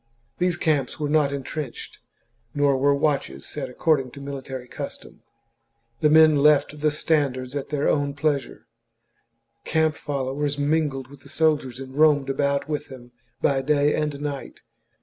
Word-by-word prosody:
These 180 Hz, -1 st, +1 dB
camps 150 Hz, -5 st, 0 dB
were 150 Hz, -1 st, -1 dB
not 150 Hz, -2 st, +3 dB
entrenched, 140 Hz, -1 st, -6 dB, 0.6 s
nor 145 Hz, -1 st, +3 dB
were 140 Hz, +2 st, +3 dB
watches 140 Hz, -, -1 dB
set 135 Hz, -3 st, -5 dB
according 135 Hz, 0 st, +1 dB
to -, -, -10 dB
mili 140 Hz, -1 st, -6 dB
tary 130 Hz, -2 st, -7 dB
custom. -, -, -8 dB, 0.8 s
The 150 Hz, -, +3 dB
men 155 Hz, -1 st, +6 dB
left 150 Hz, +1 st, +3 dB
the 150 Hz, +1 st, +2 dB
standards 140 Hz, -4 st, 0 dB
at 140 Hz, -, -4 dB
their 145 Hz, -1 st, 0 dB
own 145 Hz, -1 st, +1 dB
pleasure; 145 Hz, -3 st, -2 dB, 1.0 s
camp 160 Hz, -1 st, +1 dB
followers 140 Hz, 0 st, -3 dB
mingled 145 Hz, -3 st, 0 dB
with 140 Hz, +1 st, -14 dB
the -, -, -15 dB
sol 155 Hz, +2 st, +3 dB
diers 130 Hz, -3 st, -9 dB
and 130 Hz, -1 st, -8 dB
roamed 145 Hz, -2 st, +3 dB
about 140 Hz, +1 st, 0 dB
with 150 Hz, -1 st, -3 dB
them 125 Hz, -2 st, -12 dB, 0.3 s
by 135 Hz, -1 st, +2 dB
day 145 Hz, +1 st, +2 dB
and 150 Hz, -2 st, -2 dB
night. 145 Hz, -2 st, -6 dB
145 Hz, 155 wpm, -24 LUFS, 135-150 Hz, 1.0 s, men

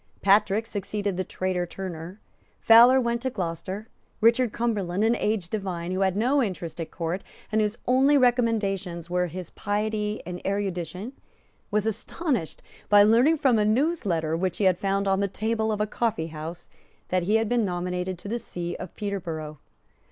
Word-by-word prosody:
Patrick 205 Hz, +2 st, +4 dB
succeeded 205 Hz, -1 st, -3 dB
the 185 Hz, -, -1 dB
traitor 185 Hz, -1 st, -2 dB
Turner. 180 Hz, +1 st, -7 dB, 0.4 s
Fowler 240 Hz, +3 st, +7 dB
went 235 Hz, -1 st, 0 dB
to 260 Hz, -, -1 dB
Gloucester. 190 Hz, +1 st, -4 dB, 0.3 s
Richard 230 Hz, +1 st, +4 dB
Cumberland, 210 Hz, -5 st, -1 dB
an 230 Hz, +2 st, +3 dB
aged 210 Hz, -7 st, -1 dB
divine, 185 Hz, -5 st, -3 dB
who 185 Hz, -, -1 dB
had 190 Hz, 0 st, +1 dB
no 260 Hz, +6 st, +3 dB
interest 175 Hz, -7 st, -4 dB
at 165 Hz, -, -5 dB
Court, 170 Hz, +3 st, -3 dB, 0.3 s
and 220 Hz, 0 st, +2 dB
whose 210 Hz, +2 st, -1 dB
only 270 Hz, +3 st, +4 dB
recommendations 205 Hz, -, +1 dB
were 180 Hz, 0 st, +1 dB
his 180 Hz, 0 st, -7 dB
piety 210 Hz, +1 st, -2 dB
and 180 Hz, 0 st, -6 dB
erudition, 195 Hz, -, -3 dB, 0.6 s
was 210 Hz, 0 st, 0 dB
astonished 225 Hz, -, -2 dB, 0.3 s
by 205 Hz, 0 st, +8 dB
learning 240 Hz, +10 st, +5 dB
from 265 Hz, -7 st, +3 dB
a -, -, +3 dB
newsletter 210 Hz, -, +1 dB
which 180 Hz, +1 st, -1 dB
he 190 Hz, -3 st, +4 dB
found 195 Hz, +2 st, -1 dB
on 195 Hz, 0 st, +2 dB
the 200 Hz, -, +1 dB
table 220 Hz, +2 st, -1 dB
of 210 Hz, -, -2 dB
a 210 Hz, -, +2 dB
coffeehouse 165 Hz, -7 st, -3 dB, 0.4 s
that 185 Hz, 0 st, +1 dB
he 200 Hz, +5 st, +1 dB
had 225 Hz, 0 st, +2 dB
been 240 Hz, +1 st, +2 dB
nominated 180 Hz, 0 st, -2 dB
to 180 Hz, -, -10 dB
the 235 Hz, +3 st, -2 dB
See 175 Hz, -6 st, -5 dB
of 175 Hz, -, -8 dB
Peterborough. 165 Hz, -8 st, -4 dB
200 Hz, 165 wpm, -26 LUFS, 180-225 Hz, 0.6 s, by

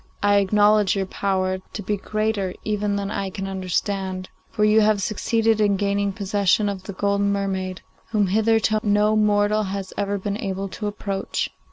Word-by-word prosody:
I 205 Hz, 0 st, +4 dB
acknowledge 205 Hz, 0 st, +4 dB
your 195 Hz, -1 st, 0 dB
power 190 Hz, -1 st, -1 dB
to 210 Hz, -, -5 dB
be 205 Hz, +2 st, 0 dB
greater 215 Hz, -2 st, -2 dB
even 210 Hz, -1 st, -1 dB
than 200 Hz, 0 st, -3 dB
I 195 Hz, -2 st, -2 dB
can 195 Hz, +1 st, -5 dB
understand, 190 Hz, 0 st, -2 dB, 0.2 s
for 210 Hz, -, +1 dB
you 215 Hz, +1 st, +5 dB
have 215 Hz, -1 st, +3 dB
succeeded 220 Hz, +2 st, +1 dB
in 200 Hz, -2 st, +3 dB
gaining 200 Hz, 0 st, 0 dB
possession 200 Hz, 0 st, +1 dB
of 195 Hz, -2 st, -4 dB
the 200 Hz, -, -8 dB
golden 200 Hz, +1 st, +1 dB
mermaid, 190 Hz, -2 st, -2 dB, 0.3 s
whom 210 Hz, -2 st, +1 dB
hitherto 220 Hz, +2 st, +2 dB
no 210 Hz, +1 st, +2 dB
mortal 210 Hz, 0 st, +3 dB
has 195 Hz, -1 st, -4 dB
ever 200 Hz, 0 st, 0 dB
been 200 Hz, +1 st, -3 dB
able 195 Hz, -1 st, -3 dB
to 210 Hz, +2 st, -5 dB
approach. 200 Hz, -1 st, -3 dB
200 Hz, 170 wpm, -23 LUFS, 195-210 Hz, 0.3 s, you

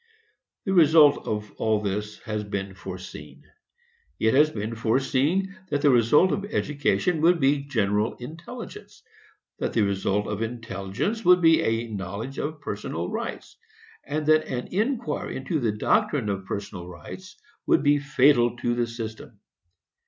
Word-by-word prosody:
The 195 Hz, -, 0 dB
result 155 Hz, -4 st, +6 dB
of 105 Hz, -1 st, -3 dB
all 110 Hz, -1 st, +1 dB
this 105 Hz, +1 st, -3 dB
has 105 Hz, -2 st, -3 dB
been 100 Hz, -1 st, -4 dB
foreseen. 95 Hz, -5 st, -9 dB, 0.8 s
It 110 Hz, 0 st, +2 dB
has 150 Hz, +3 st, +5 dB
been 110 Hz, -4 st, -4 dB
foreseen 135 Hz, -, 0 dB
that 145 Hz, -1 st, -1 dB
the 145 Hz, -, +6 dB
result 125 Hz, +9 st, +4 dB
of 200 Hz, -, -1 dB
education 150 Hz, -, 0 dB
would 170 Hz, +1 st, +4 dB
be 140 Hz, +1 st, +3 dB
general 105 Hz, -4 st, 0 dB
intelligence; 170 Hz, -, -10 dB, 0.6 s
that -, -, -2 dB
the 110 Hz, -, +3 dB
result 100 Hz, +1 st, 0 dB
of 105 Hz, 0 st, -4 dB
intelligence 115 Hz, -, -3 dB
would 180 Hz, 0 st, +6 dB
be 165 Hz, -2 st, +5 dB
a 115 Hz, +1 st, 0 dB
knowledge 105 Hz, +6 st, -5 dB
of 155 Hz, 0 st, -4 dB
personal -, -, -4 dB
rights; -, -, -5 dB, 0.5 s
and 155 Hz, 0 st, -3 dB
that 155 Hz, 0 st, +4 dB
an 125 Hz, -1 st, -4 dB
inquiry 215 Hz, -, -2 dB
into 135 Hz, +5 st, -2 dB
the 115 Hz, -5 st, +1 dB
doctrine 145 Hz, -, +1 dB
of 95 Hz, -1 st, -3 dB
personal 100 Hz, -3 st, -5 dB
rights 170 Hz, -, -11 dB, 0.3 s
would 335 Hz, 0 st, +3 dB
be 145 Hz, 0 st, +4 dB
fatal 135 Hz, -4 st, +3 dB
to 120 Hz, 0 st, 0 dB
the 120 Hz, 0 st, 0 dB
system. 115 Hz, -1 st, -7 dB
120 Hz, 145 wpm, -25 LUFS, 105-155 Hz, 0.8 s, result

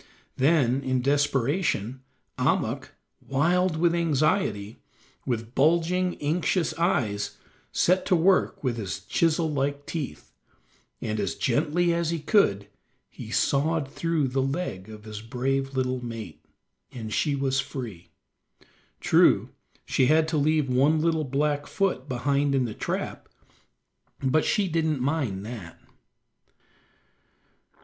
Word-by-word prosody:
Then, 135 Hz, -3 st, +3 dB
in 130 Hz, -2 st, -1 dB
desperation, 140 Hz, -, 0 dB, 0.4 s
Ahmuk, -, -, 0 dB, 0.3 s
wild 170 Hz, +5 st, +1 dB
with 170 Hz, +1 st, +3 dB
anxiety, 155 Hz, -, 0 dB, 0.5 s
with 115 Hz, -2 st, -3 dB
bulging, 170 Hz, +5 st, +2 dB
anxious 165 Hz, +3 st, 0 dB
eyes, 110 Hz, -, 0 dB, 0.3 s
set 185 Hz, +2 st, +2 dB
to 185 Hz, -, +4 dB
work 180 Hz, 0 st, +2 dB
with 125 Hz, -3 st, -1 dB
his 100 Hz, -5 st, -4 dB
chisel 165 Hz, -1 st, +1 dB
like 140 Hz, +1 st, -1 dB
teeth, 155 Hz, -5 st, -6 dB, 0.7 s
and 110 Hz, -1 st, -2 dB
as 100 Hz, -2 st, -1 dB
gently 160 Hz, +7 st, +1 dB
as 170 Hz, -1 st, 0 dB
he 170 Hz, -, 0 dB
could 125 Hz, -, +2 dB, 0.4 s
he 120 Hz, -4 st, -9 dB
sawed 145 Hz, +5 st, +1 dB
through 160 Hz, -3 st, 0 dB
the 135 Hz, +1 st, 0 dB
leg 135 Hz, -, -3 dB
of 105 Hz, -1 st, -10 dB
his 105 Hz, -1 st, -7 dB
brave 135 Hz, +3 st, -2 dB
little 130 Hz, -1 st, -1 dB
mate, 115 Hz, -8 st, -7 dB, 0.5 s
and 110 Hz, -3 st, -6 dB
she 145 Hz, -2 st, +1 dB
was 135 Hz, -1 st, 0 dB
free. 110 Hz, -12 st, -6 dB, 0.9 s
True, -, -, +4 dB, 0.4 s
she 130 Hz, -, +2 dB
had 155 Hz, +2 st, +4 dB
to 160 Hz, -, 0 dB
leave 150 Hz, 0 st, +2 dB
one 135 Hz, +5 st, +3 dB
little 160 Hz, -1 st, +1 dB
black 145 Hz, +2 st, 0 dB
foot 185 Hz, -9 st, -1 dB
behind 140 Hz, +2 st, +1 dB
in 130 Hz, -2 st, +2 dB
the 110 Hz, -, -4 dB
trap, -, -, -4 dB, 0.9 s
but 135 Hz, +4 st, +2 dB
she 205 Hz, -3 st, +1 dB
didn't 160 Hz, -3 st, 0 dB
mind 125 Hz, -8 st, -1 dB
that. 105 Hz, -8 st, -8 dB
140 Hz, 125 wpm, -26 LUFS, 125-160 Hz, 0.9 s, to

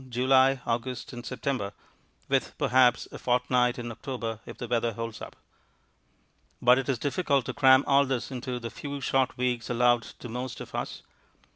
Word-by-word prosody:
July, 130 Hz, +2 st, +4 dB
August, 120 Hz, +3 st, -3 dB
and 120 Hz, 0 st, -7 dB
September 120 Hz, -5 st, -3 dB, 0.5 s
with, -, -, 0 dB
perhaps 125 Hz, -1 st, +3 dB
a -, -, -8 dB
fortnight 125 Hz, 0 st, +2 dB
in 120 Hz, -1 st, -5 dB
October 115 Hz, -2 st, -5 dB
if -, -, -9 dB
the 120 Hz, -, -5 dB
weather 115 Hz, -1 st, 0 dB
holds 115 Hz, +1 st, -6 dB
up. -, -, -8 dB, 1.2 s
But 125 Hz, +2 st, +5 dB
it 135 Hz, -, -4 dB
is 130 Hz, -, +1 dB
difficult 140 Hz, 0 st, 0 dB
to 130 Hz, -, -4 dB
cram 130 Hz, +1 st, +6 dB
all 140 Hz, 0 st, +4 dB
this 130 Hz, 0 st, -2 dB
into 125 Hz, -1 st, -4 dB
the 115 Hz, -1 st, -6 dB
few 145 Hz, -1 st, -6 dB
short 130 Hz, -1 st, 0 dB
weeks 125 Hz, -2 st, -1 dB
allowed 120 Hz, 0 st, +3 dB
to 115 Hz, -, -11 dB
most 125 Hz, +1 st, -5 dB
of -, -, -9 dB
us. -, -, -4 dB
125 Hz, 170 wpm, -28 LUFS, 120-130 Hz, 1.2 s, cram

